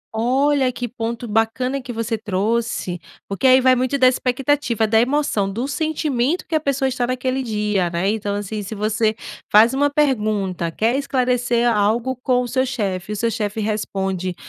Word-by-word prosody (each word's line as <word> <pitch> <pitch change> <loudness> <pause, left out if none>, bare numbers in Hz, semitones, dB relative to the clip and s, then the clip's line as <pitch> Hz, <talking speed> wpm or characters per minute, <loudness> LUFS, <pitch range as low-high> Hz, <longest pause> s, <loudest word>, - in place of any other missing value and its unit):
Olha 260 +3 +2
que 245 0 -4
ponto 235 0 -5
bacana 225 +5 0
que 250 - -7
você 225 -1 -3
trouxe, 210 -2 -1 0.3
porque 200 +6 0
aí 260 0 +7
vai 255 0 +4
muito 255 +2 0
da 260 -2 +5
expectativa, 255 -2 +1
da 220 +1 +3
emoção, 245 -7 0
do 235 +7 -3
sentimento 305 -1 -1
que - - -8
a 315 - +3
pessoa 275 -2 0
está 250 -2 -1
naquele 255 +1 -1
dia. 210 -6 -1
Né. 170 +3 -1
Então 205 -2 -2
assim, 205 +1 -4
se 205 +2 -6
você 215 +1 0 0.4
faz 220 +4 +6
uma 285 +2 +2
pergunta, 215 - 0
quer 225 +9 0
esclarecer 250 -3 +1
algo 225 +4 +1
com 250 0 0
o - - -4
seu 260 +2 +1
chefe, 205 -7 -3
o - - -3
seu 230 +2 0
chefe 215 -1 -3
responde, 195 -4 -2
235 Hz, 175 wpm, -20 LUFS, 210-260 Hz, 0.4 s, aí